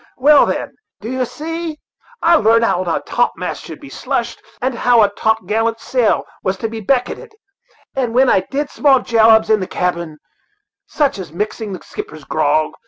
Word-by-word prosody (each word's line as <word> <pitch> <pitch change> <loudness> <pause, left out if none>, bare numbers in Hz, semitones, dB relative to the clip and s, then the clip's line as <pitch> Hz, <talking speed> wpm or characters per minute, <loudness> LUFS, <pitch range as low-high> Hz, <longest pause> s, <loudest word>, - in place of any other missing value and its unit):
Well, 285 +3 +6
then, - - -3 0.3
d'ye 255 +4 -3
see, 325 +3 -5 0.5
I 335 +1 +6
larnt 230 -4 +4
how 185 -5 +1
a 170 -3 -1
topmast - - -2
should - - -9
be 285 - -12
slushed, 240 -3 -3 0.2
and 260 +1 -1
how 240 -1 +4
a 200 - +2
topgallant 220 +1 0
sail 245 -3 +1 0.2
was 190 -1 -1
to 225 - -3
be 225 0 -6
becketted; 270 - -1 0.6
and 245 -3 -1
then 265 +1 +5
I 195 - +4
did 285 +1 -2
small 270 -3 +3
jobs 220 -1 +4
in 215 - +4
the 185 - -4
cabin, 170 -3 -2 0.7
such 285 -8 0
as 175 -5 -7
mixing 210 +3 -4
the 185 - -8
skipper's 155 -1 -8
grog. 155 +1 +1
230 Hz, 170 wpm, -17 LUFS, 200-265 Hz, 0.7 s, Well